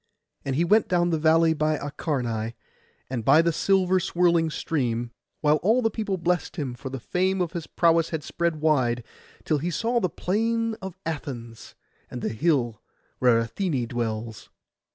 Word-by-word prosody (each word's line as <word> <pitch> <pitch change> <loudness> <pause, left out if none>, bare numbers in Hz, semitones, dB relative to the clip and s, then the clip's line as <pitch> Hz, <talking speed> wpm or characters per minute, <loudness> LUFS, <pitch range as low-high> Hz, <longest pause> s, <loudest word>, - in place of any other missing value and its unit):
And 135 -1 -2
he 165 +5 +2
went 210 +5 +4
down 175 -1 +2
the 160 - +1
valley 160 +1 +4
by 155 0 0
Acharnai, 120 -6 -3 0.5
and 125 -3 -3
by 145 +7 +6
the 170 -1 +1
silver 185 +1 +2
swirling 170 -2 +2
stream, 120 -7 -2 0.3
while 150 0 +4
all 225 - +2
the 225 - +2
people 205 -3 -2
blessed 175 0 -1
him, 140 -7 -3
for 120 +2 -7
the 135 0 -5
fame 185 +9 0
of 175 -3 -1
his 170 -3 -5
prowess 165 -1 +3
had 160 -3 -3
spread 170 -1 -1
wide, 125 -6 +2 0.4
till 155 -2 +1
he 170 +5 -2
saw 230 +8 0
the 185 - 0
plain 230 +5 0
of 190 -1 -7
Athens, 125 -8 -6 0.3
and 125 - -7
the - - 0
hill 120 - 0 0.4
where 120 -2 +4
Athené 130 - -2
dwells. 115 -2 -4
160 Hz, 170 wpm, -25 LUFS, 125-180 Hz, 0.5 s, by